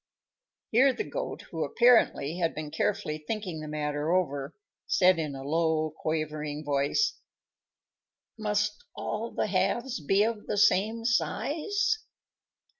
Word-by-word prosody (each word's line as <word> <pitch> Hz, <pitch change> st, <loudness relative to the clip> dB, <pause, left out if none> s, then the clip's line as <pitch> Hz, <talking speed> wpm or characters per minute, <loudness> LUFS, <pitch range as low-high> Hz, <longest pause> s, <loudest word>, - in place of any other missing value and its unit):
Here 260 Hz, +4 st, +5 dB
the 430 Hz, -, -3 dB
Goat, -, -, -5 dB
who -, -, -2 dB
apparently 230 Hz, -, +3 dB
had 165 Hz, -2 st, 0 dB
been 150 Hz, -1 st, -5 dB
carefully 155 Hz, +1 st, -1 dB
thinking 180 Hz, 0 st, -4 dB
the 155 Hz, -, -6 dB
matter 150 Hz, +1 st, -2 dB
over, 145 Hz, -5 st, 0 dB, 0.3 s
said 185 Hz, -2 st, +4 dB
in 150 Hz, -3 st, -3 dB
a 135 Hz, -, -7 dB
low, 160 Hz, +1 st, +1 dB
quavering 155 Hz, -1 st, -3 dB
voice, 145 Hz, -, +1 dB, 1.2 s
"Must 210 Hz, -1 st, -1 dB
all 220 Hz, +2 st, -3 dB
the -, -, -1 dB
halves 205 Hz, +6 st, 0 dB
be 195 Hz, +7 st, +3 dB
of 220 Hz, -1 st, -2 dB
the -, -, -1 dB
same 215 Hz, +3 st, +3 dB
size?" 335 Hz, -, 0 dB
180 Hz, 125 wpm, -28 LUFS, 150-220 Hz, 1.2 s, Here